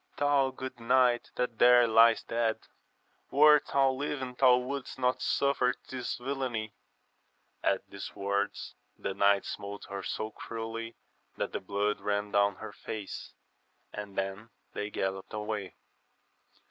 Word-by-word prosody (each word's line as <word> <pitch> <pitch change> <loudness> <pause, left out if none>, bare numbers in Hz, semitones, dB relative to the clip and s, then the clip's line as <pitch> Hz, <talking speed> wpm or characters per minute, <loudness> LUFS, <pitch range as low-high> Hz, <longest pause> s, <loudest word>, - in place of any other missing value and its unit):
thou 145 -2 +3
good 130 -1 -7
knight 120 0 +3
that 125 -3 -2
tl^re 120 0 +7
liest 115 +1 +5
dead, 115 -1 +1 0.7
wert 150 +1 +6
thou 135 -1 +3
Uving 130 -2 -4
thou 125 -1 +6
wouldst 130 +2 -4
not 125 -1 +1
suffer 140 -3 +2
this 125 -2 -3
villainy 125 -4 -3 0.9
1 - - +4
At - - -14
these 100 - -8
words 100 +1 -2 0.2
the 95 - -3
knight 100 0 +3
smote 100 0 -6
her 100 0 -4
so 110 +2 -4
cruelly 115 +1 -6 0.4
that - - -2
the - - -3
blood 100 +2 -1
ran 105 0 -1
down 100 -1 +3
her 110 +1 -9
face, 105 -1 -7 0.6
and 105 -1 -7
then 95 +3 -3 0.2
they 105 - -3
gallopped 95 -1 -3
away. 105 -3 -4
115 Hz, 135 wpm, -30 LUFS, 100-130 Hz, 0.9 s, tl^re